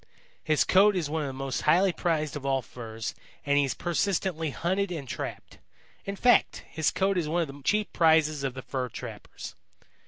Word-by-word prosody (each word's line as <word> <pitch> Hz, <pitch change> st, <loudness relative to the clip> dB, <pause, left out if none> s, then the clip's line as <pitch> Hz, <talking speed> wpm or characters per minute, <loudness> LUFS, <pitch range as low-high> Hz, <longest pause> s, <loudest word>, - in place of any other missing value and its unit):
His 155 Hz, -1 st, +3 dB
coat 200 Hz, +2 st, +5 dB
is 160 Hz, -5 st, -1 dB
one 160 Hz, 0 st, 0 dB
of 145 Hz, -, -2 dB
the 135 Hz, -, -5 dB
most 135 Hz, -1 st, -3 dB
highly 180 Hz, +4 st, +4 dB
prized 155 Hz, -3 st, -1 dB
of 145 Hz, -, -5 dB
all 135 Hz, -1 st, 0 dB
furs 115 Hz, -2 st, -6 dB, 0.3 s
and 145 Hz, 0 st, +3 dB
he 140 Hz, -, +3 dB
is 135 Hz, -, -2 dB
persistently 175 Hz, -2 st, -1 dB
hunted 185 Hz, +7 st, -1 dB
and 150 Hz, -6 st, -5 dB
trapped. -, -, -6 dB, 0.5 s
In 200 Hz, -, -3 dB
fact, 245 Hz, +4 st, +3 dB
his 160 Hz, -1 st, 0 dB
coat 190 Hz, 0 st, +1 dB
is 155 Hz, -3 st, -2 dB
one 170 Hz, +2 st, +1 dB
of -, -, -5 dB
the 140 Hz, +1 st, -10 dB
chief 210 Hz, +7 st, +1 dB
prizes 160 Hz, -3 st, +3 dB
of 135 Hz, -2 st, -2 dB
the 130 Hz, -, -7 dB
fur 130 Hz, -2 st, -3 dB
trappers. -, -, -8 dB
155 Hz, 195 wpm, -28 LUFS, 140-180 Hz, 0.5 s, coat